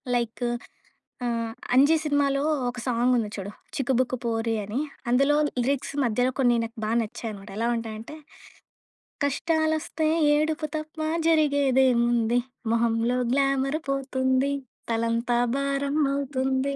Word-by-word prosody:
Like 235 0 -2 0.8
ఆహ్, 230 -1 -1 0.2
'అంజీ' 285 +5 +6
సినిమాలో 285 -2 +1 0.3
ఒక 245 0 -6
సాంగ్ 245 +1 +2
ఉంది 220 -3 -1
చూడు. 200 0 -5 0.2
'చిక్కుబుక్కు 255 -1 0
పోరి' 225 0 0
అని. 210 +6 -3 0.3
అందులో 275 +4 +4 0.3
లిరిక్స్ 270 +3 -1
మధ్యలో 245 +2 +1
కొన్ని 245 -2 +4
నాకు 230 0 -7
బా 215 - -1
నచ్చాయనమాట. 210 -2 -6
ఎలా 230 +1 0
ఉంటాయంటే, 225 +4 -6 1.1
కష్టాలు 315 +2 +1
వస్తే 315 +1 -2 0.3
ఏడుపు 310 +1 0
తప్ప 310 +1 -8 0.3
జరిగేదేముంది. 260 -6 +3 0.3
మొహంలో 230 +1 +1
గ్లామర్ 275 +1 +1
పోతుంది. 265 0 +1 0.4
తలంతా 230 +1 0 0.2
భారం 275 0 -1 0.2
అవుతుంది. 270 0 -1
255 Hz, 110 wpm, -26 LUFS, 230-280 Hz, 1.1 s, అంజీ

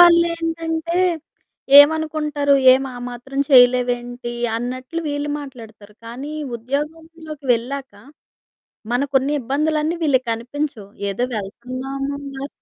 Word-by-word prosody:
వాళ్ళేంటంటే, 335 -1 +3 0.8
ఏమనుకుంటారు, 300 -1 +4 0.2
ఏం 260 +1 +3
ఆ - - -8
మాత్రం 255 +3 -7
చేయలేవేంటి, 245 -1 +3 0.2
అన్నట్లు 255 +6 -4
వీళ్ళు 290 0 -2
మాట్లాడతారు. 225 -6 -12
కానీ 265 +6 -7 0.2
ఉద్యోగంలోకి 305 +3 -6
వెళ్ళాక 265 +2 -5 1.0
మనకున్న 270 +1 +1
ఇబ్బందులన్నీ 305 +5 0
వీళ్ళకనిపించవు. 255 -3 -1 0.2
ఏదో 225 +5 -1
వెళ్తున్నాము, 255 +7 -5 0.3
వస్తున్నాము. - - -5
275 Hz, 85 wpm, -20 LUFS, 245-305 Hz, 1.0 s, ఏమనుకుంటారు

